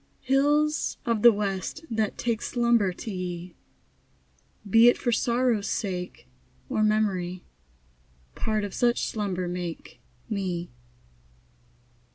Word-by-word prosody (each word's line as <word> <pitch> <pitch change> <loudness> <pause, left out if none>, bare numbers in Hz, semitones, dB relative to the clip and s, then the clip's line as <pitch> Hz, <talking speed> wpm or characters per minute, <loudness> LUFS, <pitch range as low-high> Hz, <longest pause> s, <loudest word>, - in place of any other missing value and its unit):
Hills 295 +3 +2
of 230 -3 0
the 235 - +9
west, 200 - -3
that 220 -2 -1
take 235 -2 -1
Slumber 235 -5 +2
to 215 +5 -7
ye, 180 -2 -5 1.1
Be 225 +4 +6
it - - +2
for 240 - -1
sorrow's 235 -2 +1
sake 180 - -4 0.4
Or - - 0
memory, 195 -4 0 0.9
Part 215 -1 -1
of 200 -2 -5
such 240 -1 +1
slumber 190 -4 -2
make 175 -1 -6 0.3
Me. 185 - -3
210 Hz, 110 wpm, -26 LUFS, 185-235 Hz, 1.1 s, the